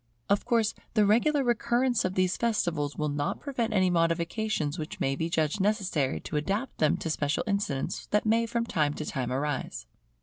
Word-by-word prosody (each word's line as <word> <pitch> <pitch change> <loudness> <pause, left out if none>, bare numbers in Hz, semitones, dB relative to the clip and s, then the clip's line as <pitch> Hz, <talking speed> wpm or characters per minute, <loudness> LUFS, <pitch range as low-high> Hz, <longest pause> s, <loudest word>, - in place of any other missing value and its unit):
Of 200 - +2
course 230 -3 +2 0.2
the 215 -2 +5
regular 275 +8 +3
recurrence 240 +1 +1
of 185 +1 -2
these 185 -1 +2
festivals 175 -11 0
will 150 - -1
not 145 0 -2
prevent 245 -5 -2
any 185 -3 +3
modifications 170 0 0
which 155 - -6
may 135 0 +1
be 160 +4 -2
judged 160 +2 0
necessary 190 - 0
to 150 - -3
adapt 200 - -2
them 155 - +3
to 165 - -4
special 145 -1 0
incidents 200 - -2
that 210 +1 +1
may 230 +1 +3
from 235 0 -1
time 150 -9 0
to 155 - -4
time 130 -4 -3
arise. 145 - -2
185 Hz, 180 wpm, -28 LUFS, 150-225 Hz, 0.2 s, the